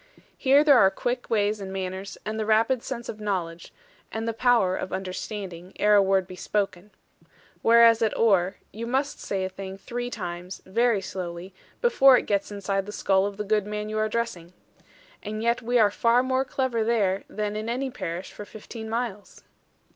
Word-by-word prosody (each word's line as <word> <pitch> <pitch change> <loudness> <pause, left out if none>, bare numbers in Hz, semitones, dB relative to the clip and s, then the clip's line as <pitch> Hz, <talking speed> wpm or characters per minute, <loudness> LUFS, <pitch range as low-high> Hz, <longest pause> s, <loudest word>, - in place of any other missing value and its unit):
Here 275 +2 +4
there 285 -5 +6
are 190 - +6
quick 245 +5 -3
ways 210 -1 +1
and 190 -1 -6
manners, 190 0 -5
and 215 +1 -3
the 215 - -1
rapid 225 +3 +3
sense 240 -2 -6
of 215 - -6
knowledge, 175 -5 -3 0.4
and 225 +1 -3
the 230 - 0
power 225 -6 +3
of - - -5
understanding, 185 -1 -6
ere 210 0 +4
a 205 - +7
word 195 -1 +2
be 185 - -10
spoken. 195 0 -2 0.7
Whereas 230 0 +6
at 220 -2 +1
Oare, 195 -4 +3 0.2
you 230 +2 -5
must 270 +4 -1
say 190 -1 -2
a - - -3
thing 190 0 -8
three 245 +4 -5
times, 180 -4 -6
very 230 +1 +2
slowly, 180 0 -6 0.3
before 275 - +6
it - - -2
gets 200 0 -1
inside 195 -1 -2
the - - -5
skull 195 -1 +2
of 200 -1 -7
the 210 - -2
good 210 0 0
man 210 0 -4
you 215 0 -2
are 215 - +2
addressing. 215 -6 -3 0.7
And 215 +1 -5
yet 235 +1 +1
we 245 +1 +1
are 210 -3 +5
far 235 +4 +3
more 260 +1 0
clever 255 -3 -1
there 205 -4 +1
than 210 0 -3
in 215 +2 -3
any 260 +2 -2
parish 175 -4 -5
for - - -8
fifteen 220 +2 -9
miles. 225 -3 -4
210 Hz, 190 wpm, -26 LUFS, 190-235 Hz, 0.7 s, a